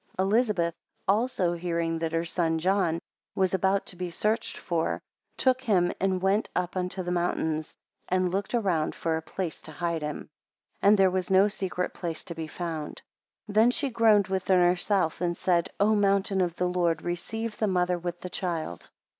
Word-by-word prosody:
3 190 - +2
Elizabeth 200 -6 +2 0.3
also, 200 -4 +2
hearing 170 -1 -1
that 165 -1 -2
her 165 +1 0
son 165 -1 0
John 180 -1 +1 0.4
was 190 -1 +1
about 190 +1 +2
to - - -8
be 180 0 -4
searched 215 +6 -1
for, 165 -2 -1 0.4
took 255 -1 +2
him 185 -8 +2
and 190 -1 0
went 195 +3 +2
up 180 0 -1
unto 185 +1 -2
the 175 - -3
mountains, 160 -3 -1 0.3
and 185 -1 +1
looked 195 +5 -1
around 180 -9 0
for 165 -1 -1
a 160 - -2
place 170 0 -5
to 160 - -9
hide 170 0 -2
him; 150 0 -3 0.6
4 - - +3
And 210 - +6
there 190 -1 +5
was 185 0 -1
no 190 +1 +6
secret 190 -3 -3
place 165 -3 -4
to 170 - -5
be 160 -1 -5
found. 160 -2 -5 0.4
5 210 - -8
Then 220 +3 +6
she 280 +1 -1
groaned 220 -4 +4
within 190 -1 +2
herself, 180 -1 +2
and 175 -1 0
said, 175 -2 +1
O 210 +2 +4
mountain 200 -1 +2
of 175 -2 0
the 180 - 0
Lord, 170 -3 0
receive 220 +6 -3
the 215 - +2
mother 180 -2 +1
with 175 0 -5
the 180 - -5
child. 165 - -4
180 Hz, 190 wpm, -27 LUFS, 170-200 Hz, 0.6 s, And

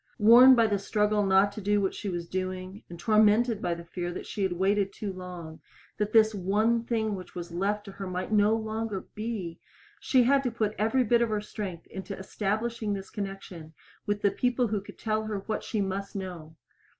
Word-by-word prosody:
Worn 240 +5 +8
by 230 -2 +4
the 205 -2 +1
struggle 210 +1 +1
not 195 +1 +4
to 215 - -7
do 205 +1 +2
what 195 -1 0
she 205 - -5
was 175 -2 -4
doing, 185 +2 -4
and 170 -1 -9
tormented 215 +2 +3
by 170 - -1
the 170 0 -10
fear 175 +1 -4
that - - -6
she 205 - -5
had 190 -2 +1
waited 195 +2 +1
too 200 -2 -5
long, 180 -3 -9 0.4
that 210 0 0
this 220 -1 +5
one 215 +4 +1
thing 220 -3 0
which 185 -2 -8
was 175 -1 -6
left 205 +4 -1
to 200 - -8
her 195 0 -7
might 185 +2 -4
no 210 +1 +4
longer 220 -2 -3
be, 210 -7 -5 0.4
she 255 -2 +3
had 275 +3 +4
to 260 - -1
put 220 -2 -1
every 225 +5 +2
bit 235 +1 +3
of 235 - +2
her 215 -1 0
strength 200 -5 -6
into 190 +1 -7
establishing 215 +3 -2
this 195 -1 -6
connection 195 -6 -7 0.3
with 205 0 -1
the 200 - +4
people 245 +2 0
who 210 -1 -1
could 200 - -13
tell 220 -1 -1
her 210 -2 -3
what 215 - -3
she 215 - -2
must 195 +1 -3
know. 175 -5 -7
205 Hz, 210 wpm, -28 LUFS, 190-220 Hz, 0.4 s, Worn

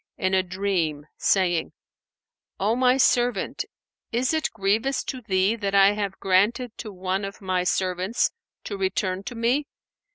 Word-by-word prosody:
in 185 0 0
a 190 - +4
dream 180 -5 -1
saying, 175 -4 +1 0.9
'O 210 +4 +2
my 255 +1 +4
servant, 245 - +2 0.5
is 250 +5 +1
it 315 -3 +1
grievous 220 +7 0
to 260 - -5
thee 195 -1 +2
that 200 -3 -2
I 195 0 +7
have 205 -2 -3
granted 215 +6 +2
to 215 - -6
one 185 +1 -2
of 195 0 -6
My 185 -3 0
servants 185 +4 0 0.3
to 200 - -5
return 190 -1 -1
to 245 - -6
Me? 245 +6 +1
200 Hz, 150 wpm, -25 LUFS, 185-235 Hz, 0.9 s, I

